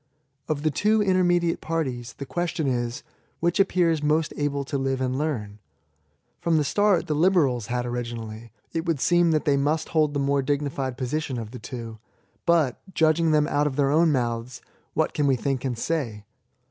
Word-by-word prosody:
Of 150 -2 -2
the 155 - +2
two 210 +7 +2
intermediate 175 -3 +2
parties, 130 -7 -3
the 140 - -7
question 165 +3 -2
is, 120 -2 -1 0.4
which 175 +4 +1
appears 175 -5 +3
most 155 +1 +1
able 140 -1 -1
to 140 - -5
live 135 -1 -1
and 130 -1 -1
learn? 120 -9 -3 0.8
From 165 -1 +2
the 150 - +3
start 205 +6 +2
the 155 - -1
liberals 150 - +2
had 125 0 -1
ori 120 0 -2
ginally, 115 -1 -7 0.2
it 165 +1 -2
would 165 -4 +1
seem 175 +3 +3
that 155 -2 +1
they 140 -2 +3
must 150 +3 0
hold 155 -2 +1
the - - +1
more 140 0 +2
dignified 135 -2 -2
position 135 0 -2
of 110 -2 -6
the 125 - -8
two. 115 -1 -7 0.5
But, 160 -7 +2
judging 160 +1 +3
them 150 -1 +3
out 145 -1 +1
of 135 - -3
their 140 -1 +2
own 160 +2 +4
mouths, 120 -2 -2 0.4
what - - +1
can 145 -1 +1
we 135 - +4
think 135 +1 -2
and 125 -3 -2
say 115 -8 -2
145 Hz, 185 wpm, -25 LUFS, 125-160 Hz, 0.8 s, own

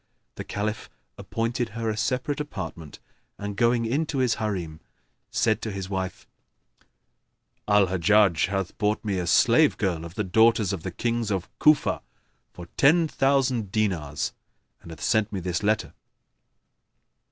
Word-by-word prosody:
The - - -7
Caliph 105 +2 -4 0.3
appointed 115 +1 -2
her 115 -1 -2
a 110 - 0
separate 125 +6 -1
apartment 85 - -6 0.4
and 100 0 -5
going 115 +1 +2
into 140 +5 -1
his 125 -4 +1
Harim, 90 -7 -3 0.5
said 110 -1 +1
to 110 - -4
his 95 -1 -6
wife, 95 -1 -4 1.4
"Al 105 -1 +5
Hajjaj 95 -1 +3
hath 95 -2 -3
bought 105 +1 0
me 100 -3 -1
a 90 - -3
slave - - +4
girl 90 -5 -1
of 85 +1 -9
the - - -1
daughters 110 +1 +3
of 95 - -4
the 95 - -4
Kings 115 +4 -2
of 95 -3 -2
Cufa[FN#10] 150 -1 +3 0.5
for 90 - -10
ten 160 +4 +5
thousand 135 -7 +1
dinars, 90 -10 -1 0.5
and - - -13
hath 80 -1 -10
sent 110 -2 +1
me 100 - -3
this 90 -1 -2
letter." 105 +1 0
105 Hz, 145 wpm, -25 LUFS, 95-115 Hz, 1.4 s, Al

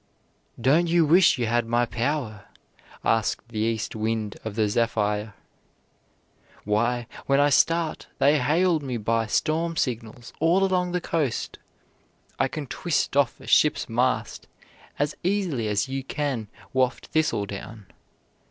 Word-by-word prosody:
"Don't 150 +8 +3
you 170 -1 +3
wish 175 +2 +5
you 120 - 0
had 120 +1 0
my 120 +1 +2
power?" 120 -3 -3 0.6
asked 115 +1 0
the 110 -2 -5
East 110 0 -1
Wind 110 -1 -2
of 110 -2 -5
the 110 -1 +2
Zephyr. 105 -1 0 1.3
"Why, 120 +4 0 0.2
when 140 0 +3
I 145 0 +4
start 165 +2 +2
they 145 +2 +4
hail 165 +6 +2
me 130 -4 -4
by 115 +1 0
storm 165 +7 0
signals 115 -2 -3
all 170 +5 +3
along 180 -2 +1
the 180 - 0
coast. 150 -9 -2 0.8
I - - +3
can 150 - -5
twist 150 +1 -1
off 140 -1 +2
a - - -13
ship's 150 - +3
mast 125 +2 -1 0.5
as 145 +1 0
easily 180 - 0
as 105 +1 0
you 135 0 -4
can 135 -6 -3 0.3
waft 130 -1 0
thistledown. 105 -8 -2
125 Hz, 135 wpm, -25 LUFS, 115-155 Hz, 1.3 s, wish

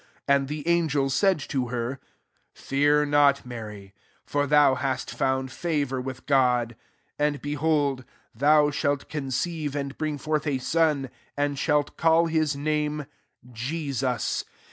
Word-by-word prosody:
30 140 - +4
And 135 -1 0
the 150 +2 -5
angel 150 -5 +2
said 190 +6 +3
to 130 -3 -2
her, 120 +2 -3 0.6
^ - - -25
Fear 145 +2 +2
noty 145 -2 +3
Mary: 105 -5 -8 0.3
for 145 0 0
thou 145 -1 +5
hasi 130 -1 -2
found 130 0 0
favour 145 -5 -1
with 130 0 -7
God. 125 -4 +2 0.4
31 150 - +4
And - - -11
beholdy 145 -2 0 0.3
thou 145 +4 +4
shalt 145 -1 -1
conceive 150 +1 -3
and 140 -1 -3
bring 155 -2 -2
forth 155 +1 -2
a 140 -2 +1
son^ 150 -1 +1 0.3
and 145 -1 0
shalt 150 0 +1
call 165 0 +4
his 155 -3 +1
name 150 0 -1 0.4
Jbsus. 130 0 -2
145 Hz, 145 wpm, -26 LUFS, 130-150 Hz, 0.6 s, thou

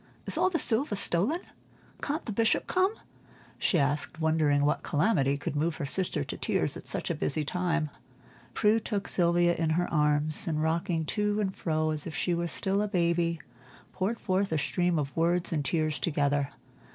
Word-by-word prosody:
Is - - 0
all - - +3
the 355 - 0
silver 230 -4 0
stolen? 200 - +1 0.6
Can't 300 +2 -2
the - - -3
Bishop 225 +2 +2
come?" 370 +2 +2 0.7
she 180 - +2
asked, 145 +3 0
wondering 155 -3 +2
what 150 - +1
calamity 145 -4 +1
could 145 - -4
move 160 +2 0
her 155 - -4
sister 180 - 0
to - - -6
tears - - +1
at - - -10
such - - -1
a - - +1
busy 150 - -1
time. 165 -1 -1 0.6
Prue 215 +2 +3
took 205 -2 -3
Sylvia 175 0 +3
in 165 -1 -1
her 175 - +1
arms, 150 0 +1
and 155 -2 0
rocking 165 +1 0
to 210 +3 0
and 190 -2 -1
fro 155 -1 0
as 155 0 -3
if 160 - -6
she 180 - 0
were 170 0 -1
still 195 +4 +1
a 210 - 0
baby, 170 -4 +1 0.5
poured 205 +5 -1
forth 190 -1 0
a 160 - +1
stream 175 +3 +1
of 140 -2 -3
words 170 +2 +1
and 150 -3 0
tears 155 -1 0
together. 145 -2 +1
170 Hz, 185 wpm, -29 LUFS, 155-195 Hz, 0.7 s, all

